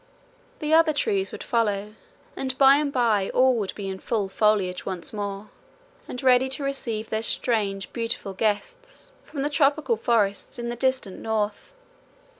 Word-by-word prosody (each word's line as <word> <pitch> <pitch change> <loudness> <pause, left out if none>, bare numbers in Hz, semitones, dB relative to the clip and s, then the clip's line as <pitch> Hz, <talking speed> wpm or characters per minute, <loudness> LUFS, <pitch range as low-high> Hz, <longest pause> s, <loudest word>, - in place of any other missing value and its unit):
The 305 +1 -1
other 320 -1 +5
trees 195 -9 0
would - - -7
follow, 210 -3 0 0.4
and 260 -1 -3
by 275 0 +7
and 295 -1 0
by 225 -7 +2
all 255 0 +5
would 200 -3 -3
be 200 -2 -5
in 190 0 -5
full 205 -3 -1
foliage 195 -3 +1
once 185 0 -5
more, 205 0 -5 0.6
and 250 - -6
ready 255 0 +5
to 285 - -6
receive 230 -6 -3
their 220 0 0
strange 205 -4 -1
beautiful 230 -4 -3
guests - - -3
from 275 -3 -5
the 290 - 0
tropical 285 -4 +2
forests 210 -3 0
in 235 0 -4
the 240 - -3
distant 260 -6 -1
north. 215 - -2
230 Hz, 160 wpm, -25 LUFS, 205-270 Hz, 0.6 s, by